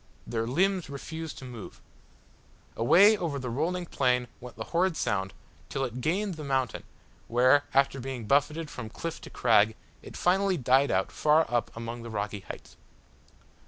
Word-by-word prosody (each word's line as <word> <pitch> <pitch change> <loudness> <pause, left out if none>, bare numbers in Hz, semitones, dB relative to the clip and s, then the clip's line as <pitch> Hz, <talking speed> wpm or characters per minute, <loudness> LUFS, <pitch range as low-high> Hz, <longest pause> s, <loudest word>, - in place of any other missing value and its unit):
Their 115 -1 -2
limbs 185 +7 +1
refused 160 +3 -6
to 130 - -9
move. 120 -4 -9 1.0
Away 195 - +6
over 170 -8 -3
the 125 -3 -4
rolling 175 +8 -1
plain 125 -5 +1
went 125 0 -10
the - - -5
horrid 175 -1 +2
sound 95 -1 -1 0.4
till 135 - -1
it 125 0 -6
gained 185 +4 -1
the 155 - -6
mountain 130 -4 -1 0.4
where, 130 +5 +4
after 135 0 +2
being 130 -3 -5
buffeted 145 +5 +1
from 115 -3 -7
cliff 165 +8 -6
to - - -10
crag, 110 -2 +3 0.3
it - - -10
finally 190 +1 +2
died 135 +1 +3
out 95 0 0
far 155 +1 +3
up 120 - +1
among 115 +1 -5
the 115 - -8
rocky 105 -1 -3
heights. - - -11
135 Hz, 160 wpm, -28 LUFS, 120-165 Hz, 1.0 s, Away